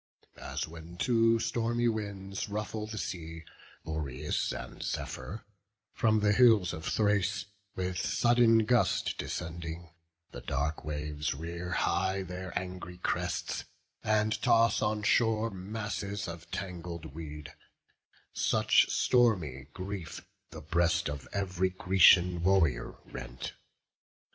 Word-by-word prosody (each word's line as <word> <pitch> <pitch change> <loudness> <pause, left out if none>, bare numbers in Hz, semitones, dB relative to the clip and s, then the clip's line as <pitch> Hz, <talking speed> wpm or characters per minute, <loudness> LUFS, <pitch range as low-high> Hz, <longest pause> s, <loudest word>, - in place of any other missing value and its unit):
As - - -3
when 85 +2 -11
two 115 +1 +3
stormy 120 +1 0
winds 100 -2 -3
ruffle 105 +1 -3
the 110 0 -6
sea, 85 -5 -5 0.4
Boreas 75 -2 -2
and 60 +1 -7
Zephyr, 70 - -4 0.5
from 110 -1 +2
the 105 0 +4
hills 110 -7 +5
of 80 +2 -6
Thrace 105 -3 +1 0.3
With 90 -1 -2
sudden 120 -1 +4
gust 120 +1 +2
descending; 85 0 -5 0.4
the - - -8
dark 70 +3 -2
waves 75 -1 -3
Rear 85 +4 -5
high 95 +1 +1
their 90 0 -6
angry 90 -1 -6
crests, 90 0 -2 0.4
and 110 0 +1
toss 115 -2 +4
on 105 0 0
shore 110 +1 +3
Masses 100 0 -4
of 85 0 -8
tangled 90 -4 -6
weed; 75 -2 -8 0.8
such - - +3
stormy 90 - +2
grief 95 -2 -6 0.2
The 80 - -9
breast 85 0 +1
of 70 -2 -7
ev'ry 95 -2 0
Grecian 90 -2 +6
warrior 85 -9 +2
rent. - - -7
95 Hz, 115 wpm, -31 LUFS, 80-105 Hz, 0.8 s, Grecian